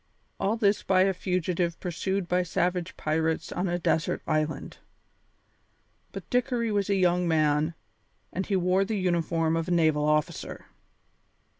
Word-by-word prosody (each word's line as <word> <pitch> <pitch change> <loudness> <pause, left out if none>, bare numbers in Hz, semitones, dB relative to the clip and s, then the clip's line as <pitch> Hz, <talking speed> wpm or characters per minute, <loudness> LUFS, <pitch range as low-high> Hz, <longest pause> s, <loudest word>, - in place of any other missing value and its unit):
All 215 +4 0
this 205 -2 +2
by 185 -1 +3
a 195 0 +2
fugitive 180 -2 -1
pursued 190 +1 -2
by 180 +1 +2
savage 180 0 -1
pirates 160 +1 -1
on 180 +2 -1
a 175 - 0
desert 165 -2 0
island! 155 0 -2 1.3
But - - -8
Dickory 245 -2 +1
was 205 -1 0
a 200 - +3
young 180 -1 +2
man, 155 0 +2 0.6
and 190 +2 -3
he 200 - +1
wore 185 +1 +2
the 215 +2 -2
uniform 165 -3 +1
of 165 +1 -1
a - - -2
naval 155 -3 +3
officer. 150 0 -1
180 Hz, 145 wpm, -27 LUFS, 160-190 Hz, 1.3 s, by